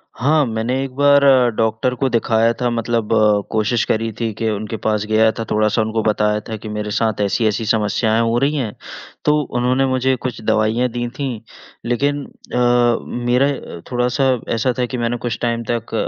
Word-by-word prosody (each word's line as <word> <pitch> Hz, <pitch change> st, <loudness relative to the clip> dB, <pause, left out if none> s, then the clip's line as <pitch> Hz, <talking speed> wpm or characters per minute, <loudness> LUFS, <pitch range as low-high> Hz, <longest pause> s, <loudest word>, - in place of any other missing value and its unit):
हाँ, 150 Hz, +3 st, +2 dB
मैंने 115 Hz, +3 st, -2 dB
एक 135 Hz, -, -5 dB
बार 140 Hz, 0 st, +5 dB, 0.3 s
डॉक्टर 110 Hz, +3 st, 0 dB
को 135 Hz, +2 st, 0 dB
दिखाया 115 Hz, -1 st, +2 dB
था 125 Hz, -, +2 dB
मतलब 115 Hz, -1 st, -1 dB, 0.4 s
कोशिश 110 Hz, +2 st, +1 dB
करी 115 Hz, 0 st, -1 dB
थी 115 Hz, -2 st, -1 dB
कि 110 Hz, +2 st, -2 dB
उनके 110 Hz, +1 st, -3 dB
पास 105 Hz, -1 st, +1 dB
गया 110 Hz, 0 st, +4 dB
था 115 Hz, -, -1 dB
थोड़ा-सा 110 Hz, +1 st, +2 dB
उनको 110 Hz, +1 st, -1 dB
बताया 105 Hz, 0 st, +1 dB
था 110 Hz, -, -3 dB
कि 110 Hz, +1 st, -8 dB
मेरे 105 Hz, 0 st, -4 dB
साथ 110 Hz, -1 st, 0 dB
ऐसी-ऐसी 110 Hz, +2 st, 0 dB
समस्याएँ 110 Hz, +1 st, +1 dB
हो 115 Hz, +1 st, +1 dB
रही 140 Hz, +3 st, +1 dB
है। 125 Hz, -7 st, -2 dB, 0.5 s
तो 150 Hz, -, +4 dB, 0.2 s
उन्होंने 125 Hz, +2 st, +2 dB
मुझे 130 Hz, 0 st, +1 dB
कुछ 120 Hz, -2 st, -5 dB
दवाइयाँ 110 Hz, +4 st, +2 dB
दीं 120 Hz, 0 st, -3 dB
थीं 130 Hz, -5 st, -3 dB, 0.5 s
लेकिन 140 Hz, +4 st, 0 dB
अ, -, -, -9 dB, 0.7 s
मेरा 125 Hz, +3 st, +3 dB
अ, 85 Hz, -11 st, -6 dB
थोड़ा-सा 125 Hz, +2 st, 0 dB, 0.3 s
ऐसा 120 Hz, +3 st, 0 dB
था 125 Hz, -, +2 dB
कि 125 Hz, +1 st, -5 dB
मैंने 120 Hz, +1 st, -1 dB
कुछ 120 Hz, -1 st, -3 dB
टाइम 115 Hz, -1 st, -1 dB
तक 115 Hz, -1 st, -3 dB
115 Hz, 180 wpm, -19 LUFS, 110-125 Hz, 0.7 s, बार